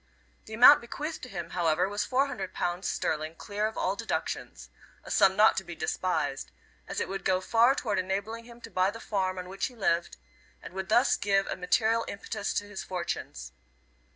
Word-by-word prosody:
The 220 - -7
amount 255 +5 +9
bequeathed 300 +7 -5
to 255 - -8
him, 175 -6 -6
however, 170 0 +1
was 205 +1 -1
four 265 +2 +2
hundred 195 -10 -6
pounds 175 +2 -2
sterling 155 +1 -2
clear 205 +4 -2
of 220 - -7
all 190 +2 0
deductions - - -4 0.3
a - - -9
sum 190 0 +5
not 215 +2 +6
to 190 - 0
be 175 -2 -8
despised, 150 -5 -2 0.4
as - - -3
it - - -1
would 195 0 -5
go 185 - +2
far 230 +7 +4
toward 210 -7 -1
enabling 200 +5 -3
him 240 0 -14
to - - -10
buy 185 +1 +2
the 225 +3 -7
farm 190 -4 -1
on 180 0 -5
which 195 +1 -2
he 250 - -13
lived, 170 -6 0 0.4
and - - -11
would 190 0 -5
thus 240 +5 +4
give 195 -1 +2
a - - -3
material 220 +5 +2
impetus 200 +1 -4
to 205 - -1
his 205 -1 -6
fortunes. 170 - -5
195 Hz, 200 wpm, -29 LUFS, 180-225 Hz, 0.4 s, amount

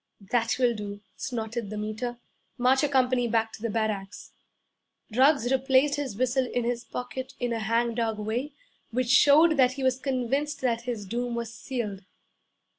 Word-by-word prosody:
'That 235 -2 +2
will 245 -2 +3
do.' 205 -2 -6 0.2
snorted 225 -3 -4
the 215 - -5
Meter. 215 +3 -4 0.4
'March 255 +2 +3
your 295 - +1
company 255 -2 +2
back 225 -1 0
to 230 +2 -4
barracks!' 210 -3 -3 0.8
Ruggs 265 -1 +4
replaced 270 +2 +3
his 270 -7 -3
whistle 255 +1 +1
in 245 0 -1
his 240 0 -2
pocket 255 +1 -6
in 245 -1 -1
a 230 - -2
hang 230 +2 +1
dog 225 -2 -1
way 235 +7 -3 0.4
which 250 0 -1
showed 300 +5 +6
that 255 -1 +4
he 270 0 -5
was 260 0 +2
convinced 275 +3 -1
that 235 -2 0
his 220 -4 -3
doom 240 +4 -3
was 235 -1 -4
sealed. 230 -5 -4
245 Hz, 165 wpm, -27 LUFS, 225-260 Hz, 0.8 s, showed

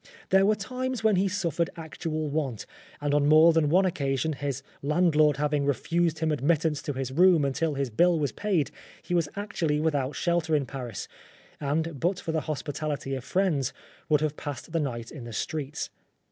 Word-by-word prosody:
There 190 +1 +5
were 215 - +4
times 255 +3 -4
when 215 -3 +4
he 195 +2 +3
suffered 175 -4 -1
actual 160 -1 -4
want; 140 -7 -2 0.4
and 145 0 0
on 145 -1 +3
more 160 +2 +7
than 160 -2 +3
one 185 +5 +4
occasion, 140 -3 0
his 140 -1 -4 0.2
landlord 150 -1 +3
having 150 0 +1
refused 160 +4 +1
him 160 0 0
admittance 150 +1 +1
to 145 - -3
his 130 -1 -3
room 170 0 +5
until 145 +3 0
his 135 -3 -2
bill 175 +9 +4
was 145 -3 0
paid, 195 -8 0 0.3
he - - -4
was 170 -4 +2
actually 175 -7 -1
without 145 -3 0
shelter 170 -2 +1
in 145 -2 +1
Paris, 125 -7 -6 0.5
and 150 +1 -1
but 180 +5 0
for 160 - -3
the 160 -1 0
hospitality 145 -1 -3
of 130 -2 -3
friends, 160 -7 0 0.4
would 150 -1 +4
have 155 -1 0
passed 145 +1 -6
the 165 - +1
night 120 -6 -3
in 130 -6 -8
the 120 - -8
streets. 150 +4 -3
155 Hz, 185 wpm, -27 LUFS, 140-170 Hz, 0.5 s, more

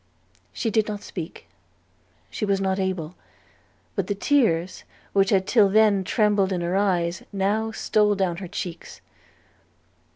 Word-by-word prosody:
She 225 - -2
did 215 0 +2
not 210 -1 -5
speak; 170 -3 -8 0.9
she - - -5
was 200 -2 +1
not 190 0 0
able: 185 -4 -2 0.8
but - - -1
the 205 - -1
tears 195 - +1 0.3
which 195 -1 +3
had 190 -2 +2
till 210 -3 +4
then 210 -1 +4
trembled 205 -1 +2
in 180 -2 -1
her 175 +2 -1
eyes 180 -3 0
now 205 +3 0
stole 210 -1 +2
down 185 -3 -1
her 185 0 -6
cheeks. 170 -2 -7
195 Hz, 140 wpm, -24 LUFS, 185-210 Hz, 0.9 s, till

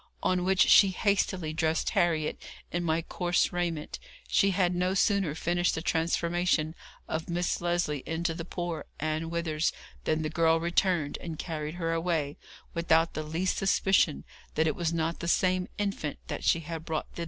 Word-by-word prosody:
On 180 -1 +2
which 190 0 +2
she 200 - +8
hastily 190 -4 0
dressed 160 0 0
Harriet 160 -3 +1 0.3
in 175 0 -1
my 165 0 +1
coarse 175 +1 0
raiment. 170 -4 -2 0.3
She 195 - +3
had 180 -2 +2
no 180 +2 0
sooner 195 -6 +2
finished 175 +2 +1
the 160 - -3
transformation 170 -1 +1 0.3
of 160 +1 -3
Miss 175 +1 -1
Lesley 175 -5 0
into 165 +1 -1
the 165 +1 -5
poor 175 -2 -4
Ann 155 +1 -2
Withers 165 -2 0 0.3
than 155 0 +1
the 155 - -2
girl 165 0 +3
returned, 170 -2 +1
and 165 -2 -6
carried 155 -1 -4
her 165 -2 -1
away, 165 -4 -1 0.3
without 170 -1 +2
the 155 - -3
least 165 +5 -1
suspicion 195 -5 +2 0.3
that 160 - +3
it 155 - +1
was 170 -2 -1
not 165 0 -1
the 170 - -4
same 185 +1 +2
infant 200 -8 -2
that - - -4
she 165 - +3
had 160 0 -6
brought 160 -2 -3
thither. - - -11
170 Hz, 170 wpm, -29 LUFS, 160-175 Hz, 0.3 s, she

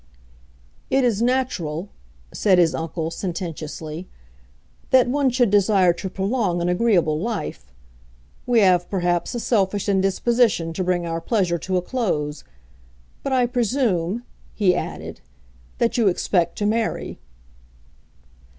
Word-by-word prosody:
"It 270 0 +2
is 230 -4 +1
natural," 210 -9 -1 0.4
said 190 -3 +3
his 170 -2 +4
uncle, 160 0 -3
sententiously, 165 -2 -5 0.8
"that 260 -2 +5
one 275 +1 +2
should 245 -4 +2
desire 195 -3 +4
to 190 +3 -6
prolong 195 -1 -1
an 170 - -1
agreeable 180 -6 +2
life. 195 - -4 0.8
We 240 -2 +4
have 180 -3 +3
perhaps 175 +2 -1
a - - -1
selfish 205 -4 0
indisposition 195 -1 +2
to 185 - -2
bring 175 -1 0
our 165 0 -3
pleasure 180 -6 0
to 185 +3 -1
a 180 - -1
close. 155 - -2 0.8
But 275 - -3
I 255 -2 +3
presume," 235 -5 0 0.3
he 190 -4 +3
added, - - -5 0.6
"that 235 +1 +1
you 225 - +4
expect 175 -2 +1
to 205 - -1
marry." 220 +2 -1
190 Hz, 125 wpm, -22 LUFS, 170-235 Hz, 0.8 s, that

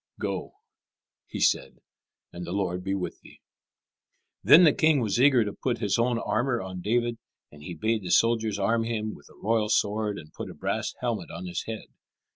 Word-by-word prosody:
"Go," - - -4 0.7
he - - -6
said, - - +1 0.6
"and 85 - -6
the 85 +1 -5
Lord 90 -2 -2
be 95 +1 -1
with 95 -2 -5
thee." - - -17 1.0
Then 175 - +8
the 155 - +6
king 155 -2 +3
was 115 0 0
eager 130 -5 +5
to 105 - -4
put 125 -2 -2
his 100 +2 0
own 120 0 +2
armour 120 +2 0
on 95 -2 -6
David, 120 +3 0 0.3
and 75 - -15
he 85 +4 -7
bade 110 0 0
the 90 - -6
soldiers 110 +1 +2
arm 115 +3 +1
him 110 -2 -3
with 70 - -15
the - - -19
royal 110 0 0
sword 105 0 +1
and 75 -1 -11
put - - -7
a - - -10
brass - - -2
helmet - - -2
on 85 +3 -7
his 90 - -4
head. 110 -1 -5
110 Hz, 195 wpm, -27 LUFS, 95-115 Hz, 1.0 s, Then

